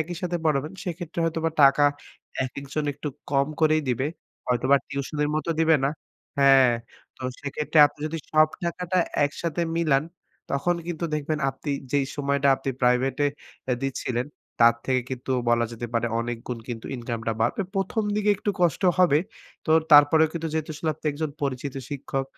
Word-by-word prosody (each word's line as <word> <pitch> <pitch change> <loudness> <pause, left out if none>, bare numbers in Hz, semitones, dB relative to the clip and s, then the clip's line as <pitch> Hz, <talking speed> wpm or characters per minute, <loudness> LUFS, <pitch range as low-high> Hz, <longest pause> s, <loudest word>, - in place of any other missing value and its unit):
একই 170 +2 -3
সাথে 175 -1 -1
পড়াবেন 150 +1 +1
সেক্ষেত্রে 175 -1 -6
হয়তোবা 165 0 0
টাকা 140 +1 +6 0.6
একেকজন 140 +3 -4
একটু 145 +2 -6 0.2
কম 140 -1 +2
করেই 155 0 +3
দিবে। 125 +3 0 0.4
হয়তো 125 0 0
বা 140 - +8
টিউশনির 145 +2 -2
মতো 155 +2 -2
দিবে 160 -1 +5
না। 135 - +2 0.5
হ্যাঁ। 135 -3 +6 0.4
তো - - -12 0.2
সেক্ষেত্রে 150 +2 -1
আপনি 145 - -15
যদি 165 +1 -4
সব 155 0 +6 0.2
টাকাটা 180 +1 -1 0.3
একসাথে 165 +3 -2
মিলান 155 -4 +2 0.5
তখন 140 +6 +1
কিন্তু 175 -1 -3
দেখবেন 150 +1 -2
আপনি 140 +2 -6 0.2
যেই 140 -2 +2
সময়টা 140 -1 +1
আপনি 135 0 -3
প্রাইভেটে 130 +3 +2 0.4
অ্যা 125 - +1
দিচ্ছিলেন, 125 -2 -2 0.3
তার 115 0 +7
থেকে 130 -1 +2
কিন্তু 130 0 -5 0.2
বলা 120 0 +3
যেতে 115 +1 -5
পারে 115 0 +1
অনেক 120 0 -3
গুণ 125 -2 -3
কিন্তু 115 -2 -5
ইনকামটা 115 -2 -3
বাড়বে। 120 - +1
১ম, 195 +3 0
দিকে 210 0 +2
একটু 205 - -1
কষ্ট 175 0 +2 0.2
হবে। 175 -6 +5 0.5
তো 155 - -1 0.2
তারপরেও 150 +2 +7
কিন্তু 165 -1 -3
যেহেতু 155 0 -2 0.2
আপনি 155 +1 -9
একজন 155 +1 -3
পরিচিত 135 0 -2 0.2
শিক্ষক 135 -1 -3
145 Hz, 160 wpm, -25 LUFS, 130-160 Hz, 0.6 s, বা